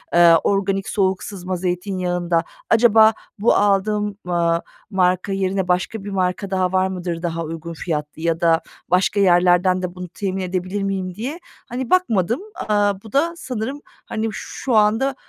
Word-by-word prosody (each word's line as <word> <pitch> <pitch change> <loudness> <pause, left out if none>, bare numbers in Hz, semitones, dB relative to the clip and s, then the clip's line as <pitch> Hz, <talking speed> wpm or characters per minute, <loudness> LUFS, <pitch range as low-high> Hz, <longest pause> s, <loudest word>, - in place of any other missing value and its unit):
ııı, 170 -1 +7
organik 195 -1 0
soğuk 190 -2 0
sızma 185 -2 -5
zeytinyağında 180 -1 -1 0.3
acaba 220 -1 +6 0.3
bu 225 - +4
aldığım, 205 0 +1
ııı, 170 -1 +1 0.3
marka 185 +1 +1
yerine 190 -1 -1
başka 185 +4 -1
bir 205 - -6
marka 185 0 -1
daha 185 -1 +1
var 185 0 +2
mıdır, 175 -3 -4
daha 165 -1 -2
uygun 165 +1 -6
fiyatlı 155 -2 -4
ya 165 0 0
da 165 -1 +4 0.3
başka 185 +3 +2
yerlerden 180 0 +4
de 180 0 -4
bunu 180 0 -6
temin 190 0 -3
edebilir 185 +2 -2
miyim 190 -2 -2
diye, 270 - -5 0.3
hani, 245 0 -4
bakmadım. 235 - +2
Aaa, 205 -2 0
bu 220 - -12
da 330 +5 +2
sanırım, 260 +2 -4
hani, 220 0 -5
şu 255 +4 -5
anda, 225 +6 +3
190 Hz, 155 wpm, -21 LUFS, 180-210 Hz, 0.3 s, ııı